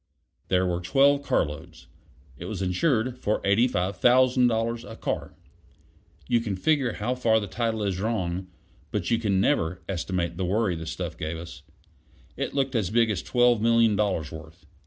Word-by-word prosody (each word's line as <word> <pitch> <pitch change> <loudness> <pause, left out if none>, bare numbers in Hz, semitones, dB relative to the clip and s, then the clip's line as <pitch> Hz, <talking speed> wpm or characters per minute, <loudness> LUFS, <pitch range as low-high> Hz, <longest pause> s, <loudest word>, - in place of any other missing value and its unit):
There 95 0 +2
were 90 -1 -1
twelve 140 +8 +3
carloads; 75 - -2 0.5
it - - -9
was - - -4
insured 120 - 0
for 105 - 0
$85,000 115 +2 +2
a - - -8
car; - - -4 0.9
you 120 - +3
can 110 -4 -3
figure 135 +3 +1
how 115 +4 -2
far 115 -3 +2
the 105 - -4
title 110 +2 -2
is 95 -2 -1
wrong, 95 -5 -2 0.4
but - - -2
you 115 -2 +1
never 95 -3 +2
can - - -25
estimate 85 -2 -2
the 95 - -1
worry 100 0 +1
the 80 0 -7
stuff - - -5
gave 80 +1 -3
us. 85 +1 -9 0.7
It - - -4
looked 135 -1 0
as 110 -7 0
big 115 +1 +2
as 100 - -2
twelve 120 -3 +3
million 115 -1 +4
dollars' 95 -7 -1
worth. 80 +1 -11
105 Hz, 160 wpm, -26 LUFS, 90-120 Hz, 0.9 s, million